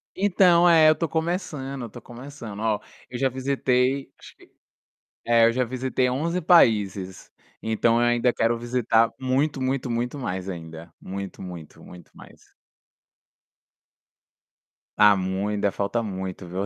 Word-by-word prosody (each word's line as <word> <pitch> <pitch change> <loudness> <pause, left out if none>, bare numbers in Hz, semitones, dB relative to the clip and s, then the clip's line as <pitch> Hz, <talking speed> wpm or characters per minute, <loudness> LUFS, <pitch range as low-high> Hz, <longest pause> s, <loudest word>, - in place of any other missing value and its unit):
Então, 180 -3 +4
é, 160 -2 +6
eu - - +6
estou 165 0 -3
começando, 160 -5 -3
eu 120 - -5
estou - - -12
começando. 120 -4 -10
Ó, 110 -2 0 0.3
eu 125 - -6
já 135 +1 +1
visitei, 130 0 0
acho - - -15
que - - -21 0.7
é, 115 -1 +4
eu 115 - +4
já 125 +2 0
visitei 130 +1 -1
11 165 +8 -1
países. 105 - +2 0.3
Então 115 +1 +1
eu 120 - +2
ainda 120 +1 +2
quero 115 0 0
visitar 115 -1 +1
muito, 135 +3 0
muito, 130 0 -2
muito 120 +3 -2
mais, 95 -8 -4
ainda. 80 -2 -9
Muito, 100 +1 -7
muito, 90 -4 -10
muito 90 -1 -14
mais. - - -17 2.4
Ah, 105 -1 +6
mui 95 +2 -2
ainda 100 -1 0
falta 100 +5 -2
muito, 95 -2 -6
viu, 95 +3 -3
120 Hz, 145 wpm, -24 LUFS, 100-135 Hz, 2.4 s, é